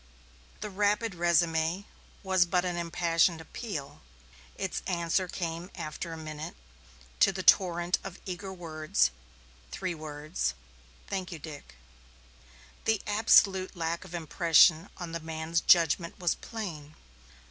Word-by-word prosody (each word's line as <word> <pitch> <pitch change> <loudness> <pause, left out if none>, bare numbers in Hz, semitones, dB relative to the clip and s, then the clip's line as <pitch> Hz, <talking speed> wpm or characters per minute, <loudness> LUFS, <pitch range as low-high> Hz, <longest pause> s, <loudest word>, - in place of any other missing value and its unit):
The 210 -1 -4
rapid 210 +3 +1
résumé 170 +1 +1 0.4
was 190 -2 +3
but 180 +1 +1
an 180 -1 -1
impassioned 170 0 +1
appeal. 160 - -7 0.5
Its 190 - -3
answer 175 0 0
came 170 0 -4
after 155 +2 -5
a 165 - -6
minute; 155 -1 -7 0.6
to - - +6
the 190 0 -5
torrent 175 -1 +4
of 195 -1 -8
eager 190 +1 -5
words, 155 - 0 0.6
three 185 - -3
words: 150 - -3 0.5
"Thank 190 -2 -4
you, 170 - -5
Dick." 150 - -10 1.1
The 220 -2 +2
absolute 205 -3 +4
lack 165 0 -2
of 175 - -9
impression 165 +1 +4
on 175 -2 -6
the 165 - -3
man's 160 +1 -2
judgment 170 0 +4
was 175 -3 +1
plain. 160 -10 -7
170 Hz, 125 wpm, -29 LUFS, 160-185 Hz, 1.1 s, to